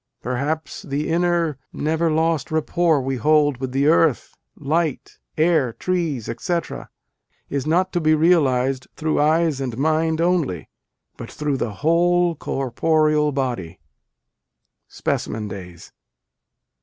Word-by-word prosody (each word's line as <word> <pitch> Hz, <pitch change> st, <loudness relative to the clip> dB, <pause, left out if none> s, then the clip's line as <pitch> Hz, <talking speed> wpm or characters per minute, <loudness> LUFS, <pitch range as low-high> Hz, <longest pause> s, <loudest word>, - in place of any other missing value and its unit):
Perhaps 140 Hz, +6 st, -3 dB
the 145 Hz, +3 st, -3 dB
inner, 170 Hz, -3 st, +1 dB
never 160 Hz, +2 st, 0 dB
lost 160 Hz, 0 st, 0 dB
rapport 160 Hz, 0 st, +1 dB
we 135 Hz, 0 st, -2 dB
hold 145 Hz, +1 st, +3 dB
with 130 Hz, 0 st, -5 dB
earth, 150 Hz, 0 st, +2 dB, 0.2 s
light, 155 Hz, 0 st, -2 dB, 0.2 s
air, 155 Hz, -7 st, +2 dB
trees, 165 Hz, -10 st, -2 dB
etc., 170 Hz, +8 st, -3 dB, 0.6 s
is 140 Hz, 0 st, -2 dB
not 180 Hz, +4 st, +1 dB
to 175 Hz, -, 0 dB
be 155 Hz, 0 st, +4 dB
realized 135 Hz, -6 st, +2 dB
through 155 Hz, -1 st, 0 dB
eyes 155 Hz, -1 st, +2 dB
and 125 Hz, -4 st, -4 dB
mind 160 Hz, +2 st, +1 dB
only, 165 Hz, -, 0 dB, 0.5 s
but -, -, -8 dB
through 150 Hz, -2 st, -2 dB
the 120 Hz, -, -2 dB
whole 175 Hz, +1 st, +3 dB
corporeal 150 Hz, +2 st, +1 dB
body." 120 Hz, -, -3 dB, 1.1 s
(Specimen 110 Hz, -1 st, -3 dB
Days.) 90 Hz, -4 st, -10 dB
155 Hz, 115 wpm, -21 LUFS, 135-165 Hz, 1.1 s, be